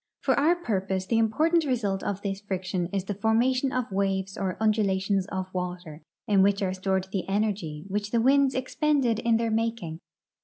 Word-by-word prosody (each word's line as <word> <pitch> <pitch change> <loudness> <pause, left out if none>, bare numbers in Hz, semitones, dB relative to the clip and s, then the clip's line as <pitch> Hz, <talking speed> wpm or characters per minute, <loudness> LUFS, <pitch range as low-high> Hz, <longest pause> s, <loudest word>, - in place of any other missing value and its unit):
For - - +2
our 315 +5 +3
purpose 195 - -2
the 225 +4 +1
important 315 +10 +2
result 220 -9 -1
of 200 0 -3
this 195 -1 -3
friction 185 -3 -3
is 195 -2 -1
the 205 - -3
formation 240 +6 +1
of 255 -2 -1
Avaves 195 0 -1
or 190 -2 -3
undulations 200 -3 +1
of 190 -2 -5
Avater, 180 -4 -5 0.3
in 200 -2 +4
Avhich 200 0 +3
are 185 - -1
stored 190 0 -1
the 195 -1 -3
energy 195 -7 -1
Avhich 205 +1 -2
the 235 - 0
Avinds 270 +3 +4
expended 260 -2 +1
in 230 -1 +2
their 230 -1 -1
making. 225 -8 -2
200 Hz, 180 wpm, -27 LUFS, 190-230 Hz, 0.3 s, in